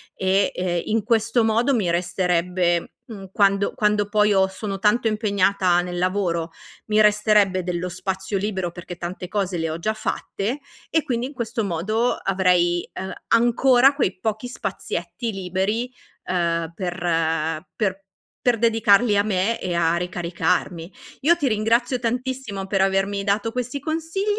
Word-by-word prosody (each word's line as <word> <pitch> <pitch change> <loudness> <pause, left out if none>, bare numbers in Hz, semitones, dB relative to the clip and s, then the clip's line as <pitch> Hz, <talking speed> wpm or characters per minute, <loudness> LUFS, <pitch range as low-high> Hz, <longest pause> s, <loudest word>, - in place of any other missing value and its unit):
e, 190 +1 +2
ehm, 175 -2 -1
in 220 0 0
questo 230 +1 +2
modo 230 +5 +2
mi 195 -7 +1
resterebbe, 175 0 0
mhmm, 200 -6 -10
quando 200 0 +2
quando 210 -1 +1
poi, 210 0 +3
io 190 -2 +4
sono 195 0 -5
tanto 215 +3 +2
impegnata 200 -4 +2
nel 175 0 -5
lavoro, 180 -3 -1 0.4
mi 215 0 +3
resterebbe 210 -3 +3
dello 180 0 -3
spazio 190 +2 -3
libero, 190 -3 -2
perché 175 0 -8
tante 180 +1 -6
cose 195 -4 -1
le 165 -1 -1
ho 160 - -4
già 215 +6 -1
fatte, 220 +3 -3 0.3
e 320 -1 +1
quindi 240 -1 -2
in 285 - -10
questo 235 -2 -3
modo 215 +7 0
avrei, 180 -2 +1
uhm, 190 - -5 0.2
ancora 245 +3 +5
quei 195 -10 0
pochi 220 +4 -2
spazietti 195 -2 -4
liberi, 195 +6 -2 0.4
uhm, 170 -2 0
per 165 -3 -1
per 195 -3 -1 0.4
per 245 -2 +3
dedicarli 225 -1 +4
a 200 - +4
me 210 +2 0
e 180 -1 -2
a 170 0 +2
ricaricarmi. 175 0 -2 0.3
Io 340 +4 +4
ti 285 - 0
ringrazio 230 +3 +1
tantissimo 245 -4 -3
per 195 -1 +1
avermi 195 +1 +1
dato 210 +2 0
questi 250 +2 -3
consigli, 325 +5 -3
200 Hz, 150 wpm, -22 LUFS, 180-225 Hz, 0.4 s, ancora